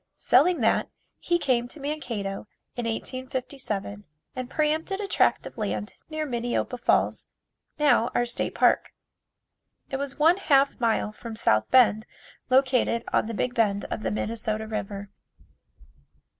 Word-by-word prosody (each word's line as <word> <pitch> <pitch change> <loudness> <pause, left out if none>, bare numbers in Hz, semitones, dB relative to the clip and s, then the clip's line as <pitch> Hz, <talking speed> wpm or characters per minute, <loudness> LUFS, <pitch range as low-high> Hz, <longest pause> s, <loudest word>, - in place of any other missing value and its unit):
Selling 300 +5 +3
that, 225 - +2 0.3
he 345 - +1
came 250 -7 +1
to 300 - -11
Mankato 235 -10 -4 0.3
in 240 - -3
1857 250 -4 -4 0.3
and 255 -1 -5
pre 300 +1 +1
empted 325 +5 -2
a 410 - -3
tract - - +2
of - - -9
land 210 0 -3 0.2
near 310 -1 -3
Minneopa 245 -1 -2
Falls, - - +1 0.5
now 260 -6 +3
our 240 - +2
State 240 - -3
Park. - - +3 1.0
It 270 - -1
was 275 -1 -4
one 325 +4 +5
half 280 -7 +3
mile 225 -2 +1
from 225 +1 -8
South 110 - +2
Bend, 225 -4 +4 0.4
located 255 -3 +3
on - - +2
the 230 - -4
big 245 +4 -1
bend 205 -4 +1
of - - -3
the - - -1
Minnesota 220 0 -2
River. 205 -2 -5
245 Hz, 145 wpm, -26 LUFS, 220-275 Hz, 1.0 s, one